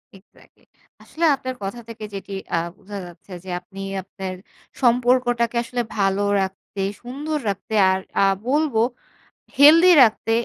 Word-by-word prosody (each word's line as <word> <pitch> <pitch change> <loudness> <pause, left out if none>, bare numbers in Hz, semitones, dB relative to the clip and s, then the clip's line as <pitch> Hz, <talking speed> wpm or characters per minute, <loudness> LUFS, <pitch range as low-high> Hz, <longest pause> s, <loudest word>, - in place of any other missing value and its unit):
Exactly. 195 +1 -22 0.4
আসলে 335 +1 -2
আপনার 255 -2 -6
কথা 195 +5 -5
থেকে 220 -1 -7
যেটি 195 0 -7 0.2
আ - - +2 0.2
বোঝা 205 0 -9
যাচ্ছে 175 +2 -15
যে 190 - -10
আপনি 190 +2 -14 0.2
আপনার 190 0 -7 0.5
সম্পর্কটাকে 245 -1 +2
আসলে 245 +1 -3 0.2
ভালো 195 0 +1 0.2
রাখতে 190 +1 -5 0.2
সুন্দর 290 +5 -4
রাখতে 200 +2 -5 0.2
আর 190 - 0 0.2
আ - - +5 0.2
বলব 295 0 +1 0.8
হেলদি 320 +5 +8
রাখতে 225 -1 +1
230 Hz, 130 wpm, -22 LUFS, 195-255 Hz, 0.8 s, হেলদি